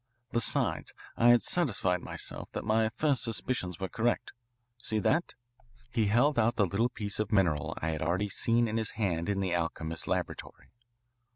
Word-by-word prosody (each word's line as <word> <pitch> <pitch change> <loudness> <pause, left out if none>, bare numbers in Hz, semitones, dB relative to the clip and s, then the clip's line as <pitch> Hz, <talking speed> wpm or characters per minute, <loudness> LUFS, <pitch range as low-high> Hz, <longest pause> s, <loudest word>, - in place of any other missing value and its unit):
Besides, 115 -1 0 0.2
I 120 - +3
had 120 0 +6
satisfied 95 - 0
myself - - -7
that - - -3
my 110 +1 +2
first 140 +4 0
suspicions 115 - -2
were 95 - -2
correct. 120 +5 -1 0.5
See 110 -1 -1
that?" 155 +10 +1 0.6
He 115 -3 +1
held 120 +6 +3
out 115 0 +3
the 105 - +3
little 100 +7 +1
piece 105 -4 -4
of 105 0 -1
mineral 85 -9 +1
I 80 - +1
had 80 - -4
already 90 +6 0
seen 115 +4 +2
in 110 +1 -1
his 110 -1 0
hand 85 -5 0
in 100 -1 0
the 95 -2 0
alchemist's 80 -1 -2
laboratory. - - -4
110 Hz, 170 wpm, -30 LUFS, 90-120 Hz, 0.6 s, had